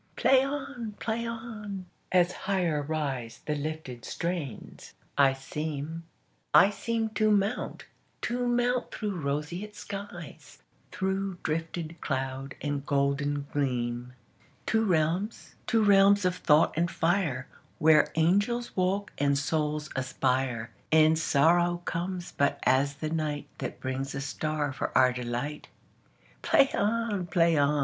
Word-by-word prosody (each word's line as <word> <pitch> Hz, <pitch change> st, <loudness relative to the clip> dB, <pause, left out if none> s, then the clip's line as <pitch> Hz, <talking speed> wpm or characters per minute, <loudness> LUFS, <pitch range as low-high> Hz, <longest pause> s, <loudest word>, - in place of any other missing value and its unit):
Play 265 Hz, -1 st, +5 dB
on! 270 Hz, -6 st, -4 dB
Play 230 Hz, +1 st, -2 dB
on! 215 Hz, -4 st, -6 dB, 0.3 s
As 180 Hz, -1 st, +4 dB
higher 180 Hz, -7 st, -1 dB
riseThe 145 Hz, -1 st, -3 dB
lifted 150 Hz, -6 st, -5 dB
strains, 170 Hz, -, -5 dB, 0.2 s
I 135 Hz, -1 st, +5 dB
seem, 150 Hz, +3 st, -5 dB, 0.5 s
I 195 Hz, -, +8 dB
seemTo 220 Hz, 0 st, 0 dB
mount, 205 Hz, +2 st, 0 dB, 0.4 s
to 245 Hz, +1 st, -1 dB
mount 245 Hz, +1 st, +1 dB
through 205 Hz, -6 st, -3 dB
roseate 150 Hz, +9 st, -3 dB
skies, 195 Hz, -8 st, -8 dB, 0.3 s
Through 190 Hz, 0 st, -2 dB
drifted 165 Hz, +1 st, -3 dB
cloud 135 Hz, 0 st, -3 dB
and 145 Hz, -1 st, -2 dB
golden 140 Hz, 0 st, 0 dB
gleam, 125 Hz, -3 st, -1 dB, 0.5 s
To 220 Hz, 0 st, +2 dB
realms, 180 Hz, +3 st, 0 dB
to 225 Hz, -1 st, +3 dB
realms 200 Hz, -1 st, +6 dB
of 180 Hz, -1 st, +2 dB
thought 155 Hz, -3 st, +4 dB
and 170 Hz, +2 st, +1 dB
fire, 165 Hz, -8 st, 0 dB, 0.3 s
Where 150 Hz, -1 st, +5 dB
angels 205 Hz, +9 st, +1 dB
walk 195 Hz, +2 st, 0 dB
and 140 Hz, 0 st, +3 dB
souls 150 Hz, +1 st, -1 dB
aspire, 130 Hz, -2 st, -1 dB, 0.2 s
And 160 Hz, 0 st, +5 dB
sorrow 175 Hz, +4 st, +3 dB
comes 175 Hz, +1 st, -3 dB
but 140 Hz, 0 st, +1 dB
as 140 Hz, +2 st, +3 dB
the 155 Hz, +2 st, -4 dB
nightThat 155 Hz, -3 st, -3 dB
brings 135 Hz, +1 st, -3 dB
a 135 Hz, -, -3 dB
star 145 Hz, 0 st, -2 dB
for -, -, -3 dB
our 130 Hz, -1 st, +5 dB
delight. 125 Hz, +4 st, -4 dB, 0.7 s
Play 275 Hz, -, +4 dB
on! 210 Hz, -3 st, 0 dB
Play 165 Hz, 0 st, +3 dB
on! 145 Hz, 0 st, +3 dB
160 Hz, 120 wpm, -28 LUFS, 140-200 Hz, 0.7 s, I